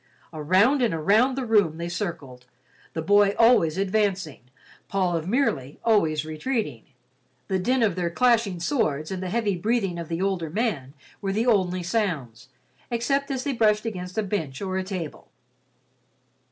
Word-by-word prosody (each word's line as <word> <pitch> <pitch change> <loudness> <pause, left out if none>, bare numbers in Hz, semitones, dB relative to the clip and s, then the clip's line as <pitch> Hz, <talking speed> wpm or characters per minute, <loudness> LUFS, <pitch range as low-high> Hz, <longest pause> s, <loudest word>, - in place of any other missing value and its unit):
Around 190 - +3
and 230 -9 +1
around 215 - +3
the 265 -1 -3
room 205 -9 +2
they 170 0 -4
circled, 165 -9 -5 0.5
the 160 - -3
boy 205 +3 +4
always 225 -9 +4
advancing, 195 - -1 0.5
Paul 185 -3 0
of 165 0 -3
Merely 155 - -1
always 160 -9 +2
retreating. 215 +10 -3 0.6
The 190 -1 +1
din 250 +6 +1
of 200 -6 +1
their 175 -2 -1
clashing 225 -3 +2
swords 155 - -1
and 190 -1 -4
the 185 - -3
heavy 210 -1 0
breathing 195 -2 -1
of 170 - -6
the 165 0 -3
older 190 -4 -1
man 160 - -2 0.3
were 195 -1 -1
the 220 +4 0
only 185 -6 +1
sounds, 145 - -2 0.4
except 275 +4 0
as 265 -2 -2
they 280 - -1
brushed 215 -2 +2
against 185 -3 -5
a 220 - +1
bench 165 -10 -3
or 190 -1 -3
a 190 - -1
table. 185 -5 -6
190 Hz, 160 wpm, -25 LUFS, 165-225 Hz, 0.6 s, boy